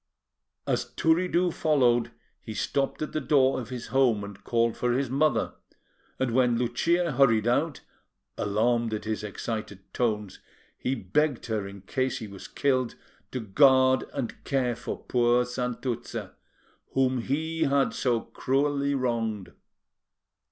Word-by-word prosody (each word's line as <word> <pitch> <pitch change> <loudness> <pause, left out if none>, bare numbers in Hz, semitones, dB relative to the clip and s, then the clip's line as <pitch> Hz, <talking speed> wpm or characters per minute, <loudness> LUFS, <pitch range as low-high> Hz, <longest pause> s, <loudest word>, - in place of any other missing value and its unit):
As - - 0
Turiddu 175 +2 +2
followed, 125 -6 +2 0.3
he 110 - -7
stopped 140 +5 -1
at - - -4
the 155 - -2
door 135 -3 +3
of 115 - -9
his 125 -2 -6
home 125 -6 +3
and 100 -1 -9
called 115 -1 +1
for 125 0 0
his 130 0 -1
mother, 140 -4 +1 0.6
and 130 -2 0
when 120 -1 +3
Lucia 165 +9 +1
hurried 115 -6 +4
out, 145 +4 +1 0.5
alarmed 115 +2 +1
at 105 - -6
his 110 0 -2
excited 105 -2 -5
tones, 105 -5 -1 0.4
he 130 - -2
begged 150 -2 0
her 110 -4 -2
in 100 0 -10
case 130 +6 -1
he 110 - -6
was 100 -2 -10
killed, 130 -4 0 0.4
to 130 - -3
guard 130 +4 +4
and 135 -5 -5
care 125 -4 0
for 120 - -5
poor 120 0 +2
Santuzza, 125 0 -4 0.6
whom 130 -1 +2
he 160 +6 -1
had 140 0 +2
so 120 -3 +1
cruelly 140 +3 0
wronged. 115 -6 -2
125 Hz, 135 wpm, -27 LUFS, 115-140 Hz, 0.6 s, hurried